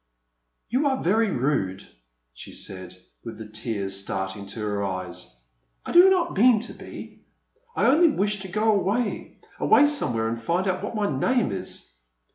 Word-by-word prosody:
You 270 Hz, +4 st, +2 dB
are 265 Hz, -1 st, -1 dB
very 220 Hz, +5 st, +2 dB
rude," 120 Hz, -, -1 dB, 0.5 s
she -, -, -10 dB
said, 95 Hz, -1 st, -8 dB, 0.3 s
with 115 Hz, -, -8 dB
the 110 Hz, -, -8 dB
tears 105 Hz, -3 st, -3 dB
starting 95 Hz, +1 st, -4 dB
to 100 Hz, -, -7 dB
her 105 Hz, -1 st, -2 dB
eyes. 95 Hz, -9 st, -5 dB, 0.5 s
I -, -, -4 dB
do 360 Hz, +2 st, +8 dB
not 355 Hz, -3 st, +1 dB
mean 230 Hz, +2 st, +5 dB
to 240 Hz, -, -5 dB
be. -, -, -11 dB, 0.5 s
I -, -, +1 dB
only 315 Hz, +7 st, +5 dB
wish 205 Hz, -6 st, 0 dB
to 190 Hz, -, -6 dB
go 215 Hz, +4 st, +1 dB
away 205 Hz, +3 st, -1 dB
— -, -, -26 dB
away 290 Hz, -, +5 dB
somewhere 125 Hz, -, 0 dB
and 115 Hz, +1 st, -3 dB
find 175 Hz, -, 0 dB
out 185 Hz, 0 st, -1 dB
what 210 Hz, -, -4 dB
my 210 Hz, -1 st, 0 dB
name 205 Hz, -, +1 dB
is. 95 Hz, -, -6 dB
180 Hz, 170 wpm, -25 LUFS, -, 0.5 s, do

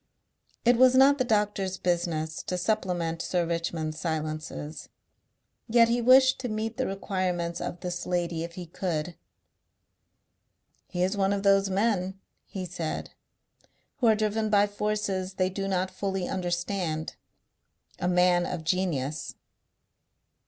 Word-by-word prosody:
It 240 Hz, 0 st, +5 dB
was 255 Hz, +1 st, +6 dB
not 275 Hz, +2 st, +6 dB
the -, -, +3 dB
doctor's 205 Hz, -4 st, 0 dB
business 170 Hz, -3 st, -1 dB
to 180 Hz, -, -1 dB
supplement 180 Hz, -4 st, -1 dB
Sir 175 Hz, -2 st, 0 dB
Richmond's 165 Hz, -2 st, -2 dB
silences. 155 Hz, -1 st, -4 dB, 0.8 s
Yet 230 Hz, 0 st, +5 dB
he 240 Hz, +1 st, +1 dB
wished 260 Hz, +2 st, +6 dB
to 250 Hz, -2 st, -3 dB
meet 220 Hz, +2 st, -3 dB
the 260 Hz, -, 0 dB
requirements 185 Hz, -3 st, -2 dB
of 175 Hz, -, -5 dB
this 175 Hz, -1 st, -4 dB
lady 175 Hz, -2 st, -1 dB
if 170 Hz, 0 st, -7 dB
he 180 Hz, -, -6 dB
could. 170 Hz, -1 st, -3 dB, 1.7 s
"He 180 Hz, -1 st, -1 dB
is 190 Hz, +3 st, +1 dB
one 195 Hz, -1 st, +2 dB
of 200 Hz, -1 st, -2 dB
those 195 Hz, 0 st, +4 dB
men," 190 Hz, -2 st, 0 dB, 0.3 s
he 190 Hz, -2 st, -5 dB
said, 170 Hz, -2 st, -4 dB, 0.9 s
"who 255 Hz, -4 st, +2 dB
are 220 Hz, -, +6 dB
driven 215 Hz, 0 st, 0 dB
by 205 Hz, -1 st, +5 dB
forces 205 Hz, -2 st, -2 dB
they 185 Hz, 0 st, +1 dB
do 195 Hz, +1 st, -3 dB
not 185 Hz, -1 st, 0 dB
fully 190 Hz, -1 st, -2 dB
understand. 175 Hz, -3 st, -2 dB, 0.8 s
A 180 Hz, -, -1 dB
man 180 Hz, 0 st, +3 dB
of 175 Hz, -3 st, -4 dB
genius." 160 Hz, -5 st, -1 dB
185 Hz, 135 wpm, -27 LUFS, 170-210 Hz, 1.7 s, was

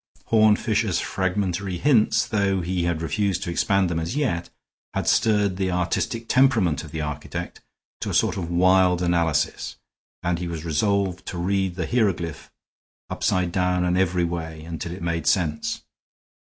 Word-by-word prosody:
Horne 110 Hz, -1 st, +5 dB
Fisher's 110 Hz, -4 st, 0 dB
fragmentary 95 Hz, -1 st, -1 dB
hints, 115 Hz, -, +3 dB
though 100 Hz, -3 st, 0 dB
he 90 Hz, 0 st, -1 dB
had 85 Hz, -1 st, -1 dB
refused 100 Hz, +1 st, 0 dB
to 90 Hz, -, -3 dB
expand 95 Hz, +3 st, +2 dB
them 85 Hz, -1 st, -1 dB
as 80 Hz, +9 st, -3 dB
yet, 120 Hz, -, -1 dB, 0.5 s
had -, -, -1 dB
stirred 105 Hz, -4 st, +2 dB
the 95 Hz, -1 st, 0 dB
artistic 90 Hz, +6 st, -1 dB
temperament 115 Hz, -, +3 dB
of 75 Hz, -, -9 dB
the 80 Hz, +1 st, -4 dB
architect 75 Hz, -1 st, -5 dB, 0.4 s
to -, -, -3 dB
a -, -, -3 dB
sort -, -, +2 dB
of 85 Hz, -3 st, -4 dB
wild 90 Hz, 0 st, +3 dB
analysis, 85 Hz, -3 st, 0 dB, 0.5 s
and 85 Hz, -1 st, 0 dB
he 90 Hz, -, -3 dB
was 85 Hz, -1 st, -5 dB
resolved 95 Hz, +3 st, 0 dB
to 90 Hz, -, -5 dB
read 95 Hz, +1 st, 0 dB
the 85 Hz, -3 st, -2 dB
hieroglyph 95 Hz, -7 st, -1 dB, 0.6 s
upside 90 Hz, -2 st, 0 dB
down 90 Hz, 0 st, +1 dB
and 90 Hz, 0 st, +1 dB
every 90 Hz, -1 st, +2 dB
way 80 Hz, -2 st, -4 dB
until 85 Hz, 0 st, -5 dB
it 90 Hz, 0 st, -7 dB
made 85 Hz, -1 st, -2 dB
sense. 75 Hz, -5 st, 0 dB
90 Hz, 160 wpm, -24 LUFS, 85-100 Hz, 0.6 s, Horne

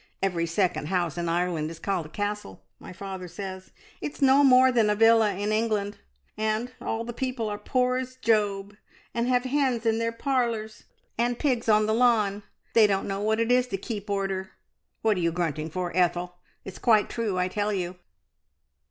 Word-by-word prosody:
Every 175 Hz, -3 st, 0 dB
second 170 Hz, -4 st, 0 dB
house 175 Hz, -4 st, -1 dB
in 170 Hz, -1 st, -2 dB
Ireland 170 Hz, -2 st, 0 dB
is 165 Hz, -, -8 dB
called 180 Hz, -3 st, -2 dB
a -, -, -17 dB
castle, 205 Hz, -, -4 dB, 0.2 s
my -, -, -10 dB
father 190 Hz, 0 st, -7 dB
says. 190 Hz, +1 st, -7 dB, 0.3 s
It's 295 Hz, -, -5 dB
no 275 Hz, +1 st, +5 dB
more 260 Hz, -1 st, +6 dB
than 230 Hz, -4 st, +3 dB
a 210 Hz, -, +2 dB
villa 225 Hz, -2 st, +4 dB
in 205 Hz, +2 st, -2 dB
England, 215 Hz, -2 st, -1 dB, 0.4 s
and 220 Hz, +3 st, -1 dB
all 225 Hz, +1 st, -3 dB
the 240 Hz, -, -5 dB
people 255 Hz, -2 st, -3 dB
are 205 Hz, -, -3 dB
as -, -, -25 dB
poor 250 Hz, 0 st, +1 dB
as 255 Hz, 0 st, -5 dB
Job, 210 Hz, -4 st, 0 dB, 0.4 s
and 235 Hz, +1 st, 0 dB
have 250 Hz, -1 st, +2 dB
hens 260 Hz, -3 st, 0 dB
in 225 Hz, 0 st, +2 dB
their 230 Hz, 0 st, 0 dB
parlours 230 Hz, -3 st, -2 dB, 0.3 s
and 240 Hz, 0 st, +1 dB
pigs 250 Hz, -6 st, 0 dB
on 215 Hz, 0 st, +5 dB
the 220 Hz, -, +1 dB
lawn. 220 Hz, -4 st, +2 dB, 0.3 s
They 220 Hz, -2 st, +6 dB
don't 195 Hz, -1 st, -1 dB
know 195 Hz, 0 st, -3 dB
what 220 Hz, +1 st, +1 dB
it 230 Hz, +1 st, +1 dB
is 250 Hz, 0 st, +3 dB
to 195 Hz, -, -3 dB
keep 205 Hz, 0 st, -6 dB
order. 195 Hz, -1 st, -2 dB, 0.5 s
What 220 Hz, -3 st, +3 dB
are -, -, -1 dB
you 170 Hz, 0 st, +1 dB
grunting 160 Hz, -2 st, -2 dB
for, 175 Hz, +1 st, -4 dB
Ethel? 180 Hz, 0 st, 0 dB, 0.3 s
It's 190 Hz, -, -8 dB
quite 220 Hz, -3 st, +4 dB
true, 220 Hz, -5 st, -2 dB
I 180 Hz, 0 st, +1 dB
tell 205 Hz, +2 st, -1 dB
you!" 180 Hz, -2 st, -3 dB
210 Hz, 195 wpm, -26 LUFS, 185-230 Hz, 0.5 s, more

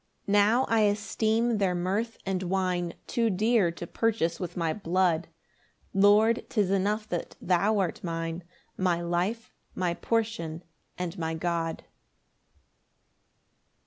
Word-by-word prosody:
5 -, -, -8 dB
Now 205 Hz, +5 st, +4 dB
I 225 Hz, -, +2 dB
esteem 220 Hz, +2 st, +1 dB
their 185 Hz, -3 st, +1 dB
mirth 200 Hz, +6 st, -1 dB
and 190 Hz, -1 st, -1 dB
wine 180 Hz, -2 st, -1 dB
Too 235 Hz, -3 st, +1 dB
dear 215 Hz, -1 st, +3 dB
to 170 Hz, -, -7 dB
purchase 190 Hz, -4 st, 0 dB
with 180 Hz, -1 st, -5 dB
my 165 Hz, -2 st, 0 dB
blood; 175 Hz, -3 st, +1 dB, 0.7 s
Lord, 210 Hz, +4 st, +5 dB
'tis 205 Hz, -5 st, +1 dB
enough 205 Hz, +2 st, 0 dB
that 175 Hz, -, -4 dB
thou 195 Hz, +4 st, +2 dB
art 185 Hz, -4 st, -1 dB
mine, 165 Hz, 0 st, -3 dB, 0.3 s
My 180 Hz, -2 st, +1 dB
life, 175 Hz, +7 st, -2 dB, 0.2 s
my 180 Hz, -2 st, 0 dB
portion, 180 Hz, -7 st, -2 dB, 0.3 s
and 180 Hz, 0 st, -4 dB
my 160 Hz, 0 st, -2 dB
God. 165 Hz, 0 st, -2 dB
190 Hz, 125 wpm, -28 LUFS, 175-215 Hz, 0.7 s, Lord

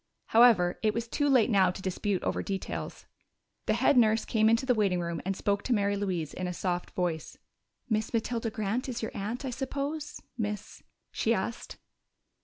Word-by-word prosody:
However, 220 Hz, -7 st, +5 dB
it 215 Hz, -1 st, +1 dB
was 230 Hz, 0 st, -2 dB
too 290 Hz, +4 st, 0 dB
late 250 Hz, -3 st, +4 dB
now 190 Hz, -3 st, +5 dB
to 180 Hz, -, -5 dB
dispute 190 Hz, 0 st, -2 dB
over -, -, -1 dB
details. 195 Hz, -2 st, -5 dB, 0.6 s
The -, -, +3 dB
head 280 Hz, -, +3 dB
nurse 220 Hz, -2 st, +4 dB
came 220 Hz, -1 st, +3 dB
into 230 Hz, +3 st, +2 dB
the 255 Hz, -, +4 dB
waiting 200 Hz, -5 st, +1 dB
room 170 Hz, -1 st, -3 dB
and 195 Hz, 0 st, -1 dB
spoke 200 Hz, 0 st, 0 dB
to 255 Hz, -, +2 dB
Mary 200 Hz, -2 st, +1 dB
Louise 185 Hz, -6 st, -2 dB
in 185 Hz, -, -3 dB
a 180 Hz, -, -3 dB
soft 175 Hz, 0 st, -2 dB
voice. 170 Hz, -4 st, -2 dB, 0.5 s
"Miss 220 Hz, -2 st, 0 dB
Matilda 230 Hz, 0 st, -1 dB
Grant 220 Hz, +4 st, -2 dB
is 240 Hz, -2 st, -4 dB
your 220 Hz, -, -2 dB
aunt, 220 Hz, +7 st, -4 dB
I 260 Hz, -, -2 dB
suppose, 280 Hz, +4 st, -4 dB, 0.2 s
Miss 210 Hz, -2 st, -4 dB, 0.2 s
?" -, -, -52 dB
she -, -, +1 dB
asked. -, -, -4 dB
215 Hz, 190 wpm, -29 LUFS, 190-235 Hz, 0.6 s, However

